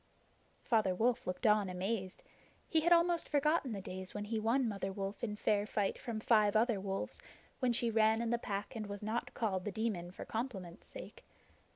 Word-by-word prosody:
Father 215 -6 +2
Wolf 235 +4 +1
looked 180 +6 -3
on 210 -3 +4
amazed. 185 +1 -3 0.4
He 320 - +3
had 345 +2 +2
almost 340 0 +4
forgotten 295 -2 +2
the 200 -3 -3
days 185 0 -6
when 205 0 -3
he 220 +1 -1
won 235 +4 +2
Mother 195 -3 -2
Wolf 195 +2 -5
in 210 -3 -1
fair 210 0 +1
fight 205 -2 0
from 230 -3 -4
five 215 -2 +4
other 225 -1 +3
wolves, 195 0 -4 0.4
when 255 -2 +2
she 235 0 +1
ran 220 0 +4
in 235 0 -1
the 235 - +1
Pack 205 +2 -4
and 215 -2 -4
was 205 0 -6
not 220 +3 -2
called 195 -6 0
The 210 - -3
Demon 200 -5 -2
for 180 - -8
compliment's 205 -7 -5
sake. - - -10
215 Hz, 195 wpm, -35 LUFS, 195-235 Hz, 0.4 s, on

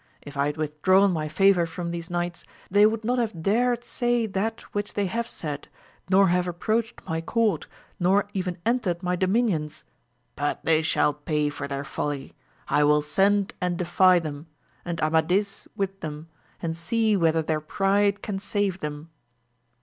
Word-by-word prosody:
If 145 - -10
I 140 +1 +1
had 150 - -3
with 150 -1 -4
drawn 190 +3 +5
my 155 -3 -2
favour 180 +1 +4
from 170 +1 -5
these 170 0 -5
knights, 175 -1 -3 0.3
they 205 +2 +6
would 220 0 -2
not 245 +3 +1
have 215 -9 -2
dared 240 +4 +2
say 240 -2 0
that 215 +2 -2
which 205 0 -3
they 205 - +1
have 230 +5 -2
said, 150 -10 -4 0.4
nor 190 0 +5
have 180 0 +1
approached 220 +6 -2
my 160 0 -1
court, 220 +4 0 0.3
nor 195 +3 +3
even 185 -3 -2
entered 205 -7 0
my 180 0 0
domini<His. 180 -6 0 0.5
But 145 0 -2
they 160 -1 +4
shall 155 -2 +2
pay 150 0 -1
for 145 -1 -5
their 140 0 -3
folly! 140 0 -4 0.3
I 150 - +3
will 150 0 +4
send 195 +5 +2
and 180 -1 0
defy 180 +1 +4
them, 155 -2 -5 0.4
and 170 -2 -4
Amadis 170 +6 +1
with 195 0 -3
them, 155 0 -7 0.3
and 165 -1 -1
see 215 +6 +1
whether 165 -3 +2
their 155 0 -1
pride 200 +5 +1
can 200 -2 -3
save 200 -2 -1
them. 150 +1 -6
180 Hz, 170 wpm, -25 LUFS, 155-205 Hz, 0.5 s, they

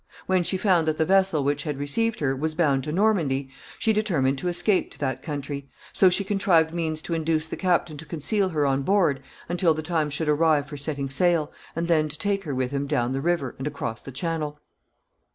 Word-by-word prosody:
When 185 -1 +2
she 185 +2 +1
found 180 -5 +2
that 155 -1 +1
the 160 - +2
vessel 190 -5 +3
which 145 +1 0
had 150 -2 -3
received 215 +11 -1
her 135 -2 +1
was 155 +3 -2
bound 140 -6 +2
to 150 - -3
Normandy, 160 -9 +1 0.3
she 220 - +2
determined 155 -11 +1
to 180 - -3
escape 175 +3 +2
to - - -15
that 130 -2 -2
country; 140 -1 -5 0.2
so 190 - +5
she 180 +3 +1
contrived 185 -5 +2
means 160 -2 -2
to 170 - -3
induce 160 -1 0
the 160 - -5
captain 175 -4 0
to 160 - -9
conceal 190 +6 0
her 150 -4 0
on 135 0 +1
board 170 -5 +2 0.3
until 170 -2 +2
the 155 - -4
time 160 -2 0
should 150 +2 -2
arrive 150 -1 +3
for 145 +1 -9
setting 140 -1 -4
sail, 165 +1 +2 0.2
and 165 +1 -1
then 155 -3 +2
to 150 - -3
take 200 0 -1
her 145 -3 -3
with 130 0 -1
him 140 0 -2
down 125 -4 0
the 135 +1 -2
river 165 -5 0
and 135 - -3
across 140 -6 -4
the 135 - -9
Channel. 150 +1 -3
155 Hz, 220 wpm, -25 LUFS, 140-175 Hz, 0.3 s, so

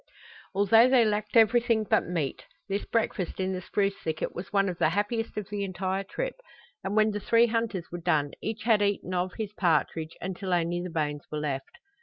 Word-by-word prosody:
Although 225 +5 +6
they 255 -3 +5
lacked 210 +1 0
everything 230 0 +4
but 210 - +1
meat, 165 -6 -3 0.2
this 200 0 -2
breakfast 220 -6 -1
in 190 0 0
the 185 - -4
spruce 200 +1 0
thicket 160 -1 -2
was 175 - -7
one 200 -1 +3
of 180 -2 -4
the - - +4
happiest 210 +5 -2
of 210 -3 -3
the 205 -1 -2
entire 190 0 -2
trip, - - -3 0.5
and 195 +2 -2
when 215 0 +4
the 205 - -3
three 230 +3 +4
hunters 225 -6 -1
were 175 - -5
done 145 -3 +1
each 220 0 -4
had 220 -2 +4
eaten 200 -2 0
of 180 0 -1
his 215 -2 -4
partridge 160 -3 0
until 185 0 -3
only 175 0 0
the 180 - -5
bones 150 -3 -2
were 150 - -2
left. 150 - -4
195 Hz, 200 wpm, -28 LUFS, 175-215 Hz, 0.5 s, Although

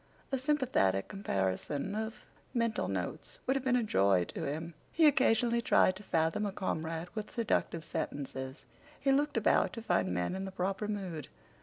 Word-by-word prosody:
A 270 - +1
sympathetic 255 - +2
comparison 140 - -2
of 220 +1 -4 0.3
mental 230 -2 +1
notes 95 -2 -4
would 265 - +2
have 270 - -1
been 260 -2 +3
a 245 - +2
joy 100 - +3
to - - -5
him. 160 +4 -3 0.2
He 325 - +4
occasionally 235 -5 +4
tried 185 -4 +4
to - - -10
fathom 165 +1 +1
a - - -2
comrade 165 -3 -3
with 215 -1 -4
seductive 205 -8 0
sentences. 135 -1 -4 0.3
He 275 - +2
looked 285 -1 +2
about 225 - +3
to 230 - -5
find 95 - +1
men 90 - 0
in 190 +1 -3
the 190 - -5
proper 190 +3 -1
mood. 185 -8 -4
195 Hz, 170 wpm, -32 LUFS, 145-230 Hz, 0.3 s, He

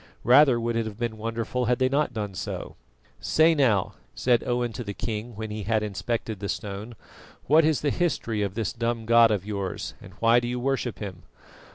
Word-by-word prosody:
Rather 130 0 +6
would 115 0 -1
it 115 -1 0
have 105 -2 -8
been 115 -1 -2
wonderful 115 +3 -2
had 120 +1 +2
they 130 - +2
not 140 +1 +1
done 105 -4 -4
so. 95 - -5 0.4
"Say 160 +1 +4
now," 120 -11 +2 0.2
said 120 -2 +2
Owen 120 -1 0
to 120 - -5
the 100 -2 -6
king 110 +1 -4
when 110 0 -5
he 105 0 -4
had 110 +1 0
inspected 105 +1 -3
the 100 0 -4
stone, 105 +2 -5 0.5
"what 155 +4 +5
is 155 -1 +2
the 145 - +1
history 135 -11 -1
of 100 -1 -2
this 110 -4 -2
dumb 115 -1 -2
god 115 0 +6
of 100 -3 -1
yours, 100 0 -4
and 95 - -12
why 115 +3 +4
do 120 - -4
you 125 +1 -2
worship 130 -2 -1
him?" 95 -5 -7
115 Hz, 205 wpm, -26 LUFS, 105-125 Hz, 0.5 s, Rather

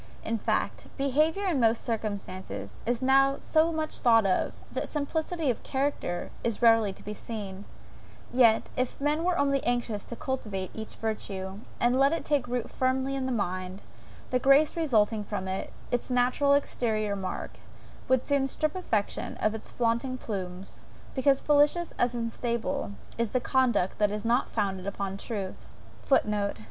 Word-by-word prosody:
In 225 0 -1
fact, - - -1
behaviour 305 +8 +2
in 340 -8 +1
most 230 -1 +3
circumstances 190 - -4
is 240 +1 0
now 270 +1 +5
so 320 +1 +2
much 315 -1 -2
thought 225 -3 +5
of, 185 -1 +1 0.2
that - - -3
simplicity 315 0 -1
of 235 - -6
character 265 -10 -2
is 230 -3 0
rarely 225 -3 +5
to - - -13
be 210 - -5
seen; 205 -3 -6 0.7
yet, 230 -3 +5
if 255 0 -1
men 295 +3 +1
were 355 0 +2
only 275 -1 +2
anxious 240 -4 0
to 235 - -7
cultivate 220 -10 -3
each 220 0 -7
virtue, 195 -3 -4 0.2
and 245 +2 +3
let 275 +3 +5
it 330 - -2
take 285 -5 +1
root 245 -1 -2
firmly 260 +1 0
in 265 -1 -1
the - - -1
mind, 185 -3 -3 0.5
the 250 - +3
grace 275 +4 +5
resulting 225 -9 +2
from 200 -2 -4
it, 190 0 -3 0.2
its 245 +1 -1
natural 255 +3 +3
exteriour 215 -7 0
mark, 190 -2 -5 0.5
would 260 -1 +3
soon 280 -2 +2
strip 305 +4 -1
affectation 220 - -1
of 215 - +1
its 220 - -7
flaunting 240 +2 0
plumes; 190 -5 -5 0.3
because, 270 0 +3
fallacious 295 +4 +3
as 245 0 +2
unstable, 235 +1 -2 0.3
is 235 -2 +1
the - - +2
conduct 250 -7 +1
that 210 -1 +4
is 210 +1 -4
not 240 +3 +2
founded 195 -3 -2
upon 200 -1 -3
truth! 200 -2 -5 0.3
(Footnote. 210 -6 +1
240 Hz, 160 wpm, -28 LUFS, 210-275 Hz, 0.7 s, now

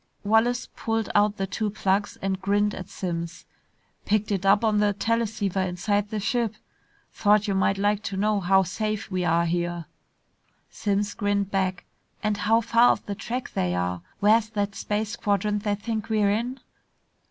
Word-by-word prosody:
Wallace 225 +4 +2
pulled 225 -1 -2
out 205 0 +3
the 195 - -1
two 210 +2 -2
plugs 200 0 0
and 190 -1 -1
grinned 205 +1 +1
at 185 +1 -7
Simms. 170 -2 -5 0.6
"Picked 215 0 0
it 195 -1 0
up 205 +3 +5
on 215 -2 +3
the 205 -1 +3
teleceiver 210 -2 -1
inside 200 +3 -1
the 215 - -2
ship. 230 0 0 0.6
Thought 210 0 +3
you 200 - +1
might 190 +1 +2
like 205 +1 +1
to 195 - -3
know 210 +1 +2
how 190 +1 +4
safe 215 +3 -3
we 185 -1 -1
are 170 0 +2
here." 175 0 -2 0.9
Simms 205 0 -1
grinned 200 -1 -1
back, 190 -2 -1 0.4
"And 215 -1 +1
how 225 +2 +3
far 230 +2 +4
off - - 0
the 205 - -3
track 235 +5 -5
they 90 -1 0
are. 90 0 -2 0.2
Where 215 +3 +6
is 215 -1 -9
that 205 -2 -2
space 210 +2 -2
quadrant 205 0 0
they 205 0 0
think 215 +1 -4
we're 210 -2 +3
in?" 240 +5 -2
205 Hz, 175 wpm, -25 LUFS, 195-215 Hz, 0.9 s, Where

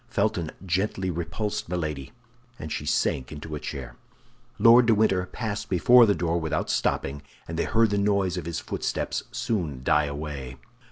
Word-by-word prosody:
Felton 100 -7 0 0.2
gently 95 +1 -1
repulsed 85 +4 -3
Milady, 80 -4 -3 0.5
and 75 - -7
she - - -4
sank 65 0 0
into 75 +1 -7
a 75 - -3
chair. - - -7 0.6
Lord 115 +3 +7
de 115 - +5
Winter 95 -4 +2
passed 110 -1 -4
before 120 +6 +6
the 100 - +3
door 85 +1 0
without 80 -2 -1
stopping, 70 +1 -1 0.3
and 80 - -5
they 85 - 0
heard 115 -2 +3
the 100 - +1
noise 100 -3 +1
of 75 - -5
his 85 -1 -3
footsteps - - -3
soon 80 - -2
die 75 +3 +3
away. 70 -3 -6
90 Hz, 165 wpm, -26 LUFS, 75-105 Hz, 0.6 s, Lord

